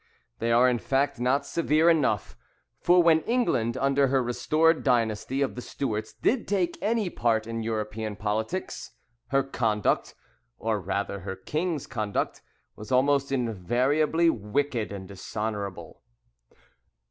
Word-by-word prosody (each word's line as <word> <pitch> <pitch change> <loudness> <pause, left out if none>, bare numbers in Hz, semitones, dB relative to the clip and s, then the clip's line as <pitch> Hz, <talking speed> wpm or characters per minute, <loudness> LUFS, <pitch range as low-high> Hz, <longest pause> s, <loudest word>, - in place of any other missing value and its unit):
They 115 +1 0
are, 120 +2 +5
in 125 -2 +1
fact, 135 +1 0
not 130 +3 +1
severe 160 -1 +2
enough: 140 - +2 0.4
for 175 0 +5
when 165 -1 +5
England, 150 - 0
under 140 +1 +2
her 135 -1 +2
restored 155 +7 +2
dynasty 120 +1 +1
of 135 - -2
the 125 - -6
Stuarts, 110 -4 -3
did 240 -2 0
take 185 -4 0
any 215 -3 0
part 110 -2 +1
in 115 0 -4
European 110 -1 -3
politics, 110 - -3 0.3
her 135 0 +2
conduct, 115 -6 0 0.4
or 110 -2 -1
rather 100 +2 -2
her 95 - -5
king's 155 - -2
conduct, 105 -5 -2 0.3
was 105 0 -10
almost 140 +2 +3
invariably 130 - +1
wicked 120 -2 -1
and 95 -2 -7
dishonourable. 100 0 -5
125 Hz, 130 wpm, -27 LUFS, 110-145 Hz, 0.4 s, are